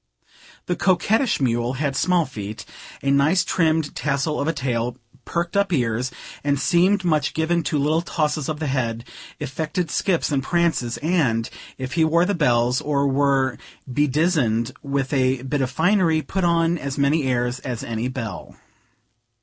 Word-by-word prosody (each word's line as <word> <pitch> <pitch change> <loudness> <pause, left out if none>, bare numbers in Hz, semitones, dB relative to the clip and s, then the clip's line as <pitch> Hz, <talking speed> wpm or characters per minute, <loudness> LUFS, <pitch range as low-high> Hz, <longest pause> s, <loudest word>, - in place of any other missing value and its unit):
The 180 - -1
coquettish 215 +8 +2
mule 120 -2 0
had 140 0 -2
small 180 +2 +2
feet, 105 -6 -7 0.4
a 140 - +2
nicely 145 +7 +3
trimmed 160 -3 +1
tassel 140 +1 -1
of 140 - -1
a - - +3
tail, 125 -4 -2 0.3
perked 170 +1 -2
up 200 -1 +2
ears, 125 -4 0 0.3
and 140 -1 +1
seemed 180 +6 +3
much 155 -4 +1
given 170 +2 +1
to 150 - 0
little 150 +3 +2
tosses 155 -4 -1
of 155 -1 -3
the 160 - -2
head, 120 -4 -2 0.3
affected 155 +3 -3
skips 175 -5 0
and 140 -2 +1
prances; 160 -6 0
and, 135 -10 +1 0.3
if 130 0 -5
he 165 - +3
wore 165 +2 +3
the 200 - 0
bells, 125 -6 +2
or 140 -1 0
were 135 -3 +1 0.3
bedizzened 135 -4 +1
with 140 -1 -2
a 130 -1 +1
bit 135 +2 -1
of 130 - 0
finery, 160 +1 +2
put 190 -1 -2
on 170 0 +2
as 140 -1 -4
many 140 +1 +2
airs 125 -1 0
as 125 -4 -5
any 115 +1 -3
belle. 115 -6 -6
145 Hz, 160 wpm, -22 LUFS, 130-165 Hz, 0.4 s, nicely